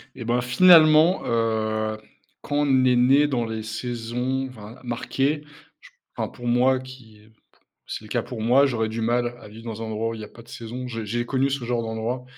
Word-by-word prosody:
Et 125 Hz, -, -7 dB
bah 120 Hz, +2 st, +1 dB
finalement 155 Hz, +5 st, +6 dB
heu, 110 Hz, -1 st, 0 dB, 0.4 s
quand 145 Hz, -, -3 dB
on 135 Hz, -3 st, +3 dB
est 125 Hz, -1 st, +4 dB
né 135 Hz, +4 st, +5 dB
dans 125 Hz, -4 st, 0 dB
les 110 Hz, -1 st, -4 dB
saisons 120 Hz, +3 st, -3 dB
v 130 Hz, -, -14 dB, 0.3 s
marquées, 135 Hz, +5 st, -1 dB, 0.4 s
je -, -, -17 dB
p -, -, -39 dB, 0.2 s
enfin, -, -, -2 dB
pour 120 Hz, -, -10 dB
moi 125 Hz, +2 st, +3 dB
qui, 125 Hz, -5 st, -13 dB, 0.7 s
c'est -, -, -6 dB
le -, -, -12 dB
cas 120 Hz, +1 st, -1 dB
pour 115 Hz, -1 st, -7 dB
moi, 125 Hz, +5 st, +4 dB
j'aurais 110 Hz, -5 st, -1 dB
du 110 Hz, +1 st, -4 dB
mal 120 Hz, +1 st, 0 dB
à -, -, -12 dB
vivre 110 Hz, +2 st, -12 dB
dans 115 Hz, -1 st, -6 dB
un -, -, -4 dB
endroit 110 Hz, +1 st, -2 dB
où -, -, -5 dB
il 110 Hz, -, -8 dB
y -, -, -6 dB
a -, -, -11 dB
pas 115 Hz, -, -14 dB
de 120 Hz, -, -23 dB
saison. 125 Hz, +1 st, -7 dB
J 115 Hz, -2 st, -5 dB
j'ai 120 Hz, +3 st, -2 dB
connu 135 Hz, +1 st, +1 dB
ce 135 Hz, -2 st, -3 dB
genre 120 Hz, -1 st, -1 dB
d'endroit. 115 Hz, +3 st, -3 dB
120 Hz, 220 wpm, -24 LUFS, 115-130 Hz, 0.7 s, finalement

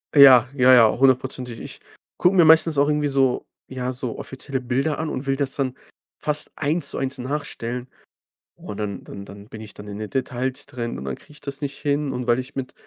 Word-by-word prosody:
Ja, 130 Hz, -4 st, +9 dB
ja, 130 Hz, -1 st, +6 dB
ja, 115 Hz, -3 st, +6 dB
hundertprozentig. 130 Hz, -2 st, +1 dB
Ich -, -, -9 dB, 0.4 s
gucke 180 Hz, +2 st, +3 dB
mir 175 Hz, -, +7 dB
meistens 160 Hz, -1 st, +5 dB
auch 145 Hz, -, +4 dB
irgendwie 150 Hz, -1 st, +1 dB
so, 135 Hz, -2 st, +1 dB, 0.2 s
ja, 130 Hz, -1 st, -3 dB
so 125 Hz, -2 st, -5 dB
offizielle 135 Hz, 0 st, -5 dB
Bilder 130 Hz, +5 st, -1 dB
an 160 Hz, 0 st, -2 dB
und 135 Hz, -1 st, -5 dB
will 135 Hz, -, +2 dB
das 135 Hz, -1 st, -2 dB
dann 130 Hz, -2 st, -2 dB, 0.4 s
fast 150 Hz, 0 st, -3 dB
1 155 Hz, +3 st, 0 dB
zu -, -, -3 dB
1 135 Hz, 0 st, -3 dB
nachstellen. 125 Hz, -2 st, -4 dB, 0.7 s
Und 105 Hz, -, -8 dB
dann 105 Hz, -2 st, -3 dB
und 100 Hz, -, -8 dB
dann 100 Hz, +1 st, -12 dB
bin 110 Hz, -1 st, -10 dB
ich 105 Hz, -, -10 dB
dann 105 Hz, -, -11 dB
in 100 Hz, 0 st, -6 dB
den 110 Hz, -, -5 dB
Details 130 Hz, -1 st, -2 dB
drin 120 Hz, -, -5 dB
und 65 Hz, -, -7 dB
dann 65 Hz, -1 st, -3 dB
kriege -, -, -18 dB
ich 150 Hz, -, -17 dB
das 140 Hz, +1 st, -6 dB
nicht 140 Hz, -1 st, -4 dB
hin 145 Hz, -1 st, -1 dB
und 125 Hz, 0 st, -4 dB
weil 120 Hz, +1 st, +3 dB
ich 130 Hz, +1 st, -7 dB
mit 130 Hz, -1 st, -5 dB
130 Hz, 220 wpm, -23 LUFS, 120-140 Hz, 0.7 s, Ja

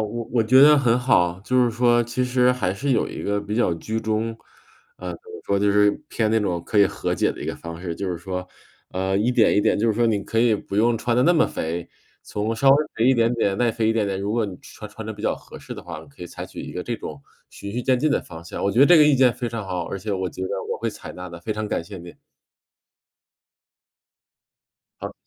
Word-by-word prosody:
我 110 Hz, +2 st, -3 dB
我 115 Hz, -2 st, +3 dB
觉 130 Hz, +5 st, +6 dB
得 150 Hz, 0 st, +7 dB
很 125 Hz, -2 st, +2 dB
好。 90 Hz, -9 st, +2 dB
就 125 Hz, +5 st, +2 dB
是 120 Hz, -, +1 dB
说 120 Hz, 0 st, +3 dB
其 120 Hz, +2 st, -2 dB
实 125 Hz, 0 st, +3 dB
还 100 Hz, -8 st, -1 dB
是 140 Hz, +8 st, -3 dB
有 -, -, +1 dB
一 -, -, -7 dB
个 100 Hz, 0 st, -1 dB
比 105 Hz, +1 st, -5 dB
较 115 Hz, -7 st, +2 dB
居 110 Hz, +7 st, -4 dB
中 110 Hz, +1 st, -2 dB, 0.6 s
呃， -, -, -6 dB
怎 -, -, -9 dB
么 440 Hz, -, -9 dB
说 100 Hz, -, +1 dB
就 100 Hz, 0 st, +2 dB
是， 105 Hz, 0 st, +4 dB, 0.2 s
偏 110 Hz, -2 st, 0 dB
那 110 Hz, -, +2 dB
种 90 Hz, -5 st, -2 dB
可 105 Hz, -, 0 dB
以 100 Hz, -, +7 dB
和 -, -, -3 dB
解 -, -, +1 dB
的 -, -, -9 dB
一 -, -, -5 dB
个 -, -, -3 dB
方 85 Hz, 0 st, -9 dB
式。 85 Hz, -2 st, -4 dB
就 95 Hz, +2 st, -4 dB
是 85 Hz, -, -3 dB
说， 90 Hz, +1 st, -5 dB, 0.5 s
呃， 95 Hz, +1 st, -1 dB
一 115 Hz, +4 st, +1 dB
点 120 Hz, -3 st, +4 dB
一 -, -, +5 dB
点 -, -, +2 dB
就 115 Hz, -, +1 dB
是 110 Hz, -, +3 dB
说， 120 Hz, +2 st, +1 dB
你 105 Hz, -3 st, +1 dB
可 115 Hz, -, -2 dB
以 115 Hz, -2 st, +4 dB
不 100 Hz, -, -6 dB
用 115 Hz, +2 st, +3 dB
穿 120 Hz, +1 st, -1 dB
得 125 Hz, -, +3 dB
那 175 Hz, -, +5 dB
么 160 Hz, -, +4 dB
肥， 85 Hz, +2 st, -4 dB, 0.3 s
从 110 Hz, +2 st, -3 dB
稍 135 Hz, +3 st, +4 dB
微 135 Hz, -, +7 dB, 0.2 s
肥 115 Hz, -, +1 dB
一 130 Hz, -, +5 dB
点 115 Hz, 0 st, +2 dB
点 100 Hz, -4 st, 0 dB
耐 120 Hz, -1 st, +2 dB
肥 110 Hz, -1 st, 0 dB
一 115 Hz, -, +3 dB
点 110 Hz, -3 st, 0 dB
点， 95 Hz, -1 st, -2 dB
如 100 Hz, +2 st, -2 dB
果 115 Hz, -1 st, +1 dB
你 90 Hz, -2 st, -7 dB
穿 105 Hz, -1 st, -11 dB
穿 110 Hz, +1 st, -9 dB
得 110 Hz, -, -4 dB
比 105 Hz, -, -12 dB
较 -, -, +1 dB
合 -, -, -13 dB
适 -, -, -9 dB
的 -, -, -9 dB
话， -, -, -8 dB
你 -, -, -15 dB
可 140 Hz, -, -13 dB
以 -, -, -6 dB
采 -, -, -8 dB
取 -, -, -9 dB
一 -, -, -8 dB
个 90 Hz, -, -4 dB
这 120 Hz, -1 st, -3 dB
种， 75 Hz, -8 st, -8 dB, 0.3 s
循 100 Hz, -, -8 dB
序 120 Hz, +3 st, -3 dB
渐 130 Hz, 0 st, +2 dB
进 155 Hz, +2 st, +1 dB
的 -, -, +2 dB
方 85 Hz, -1 st, -11 dB
向。 85 Hz, -, -6 dB
我 100 Hz, -, +1 dB
觉 120 Hz, -, +2 dB
得 140 Hz, -, +8 dB
这 175 Hz, -, +7 dB
个 150 Hz, -, +7 dB
意 150 Hz, -, +5 dB
见 130 Hz, -2 st, +4 dB
非 120 Hz, -, -3 dB
常 115 Hz, -2 st, -4 dB
好， 90 Hz, -2 st, -3 dB
而 100 Hz, -, -5 dB
且 105 Hz, +3 st, -5 dB
我 95 Hz, -1 st, -1 dB
觉 95 Hz, -, -7 dB
得 95 Hz, -, -2 dB, 0.2 s
我 -, -, -2 dB
会 -, -, -2 dB
采 -, -, -10 dB
纳 90 Hz, 0 st, -8 dB
的， 85 Hz, 0 st, -9 dB
非 110 Hz, +5 st, -3 dB
常 105 Hz, 0 st, -4 dB
感 85 Hz, -, -2 dB
谢 100 Hz, -1 st, -9 dB
你。 85 Hz, 0 st, -11 dB, 2.9 s
好， -, -, -6 dB
110 Hz, 295 characters per minute, -23 LUFS, 95-120 Hz, 2.9 s, 得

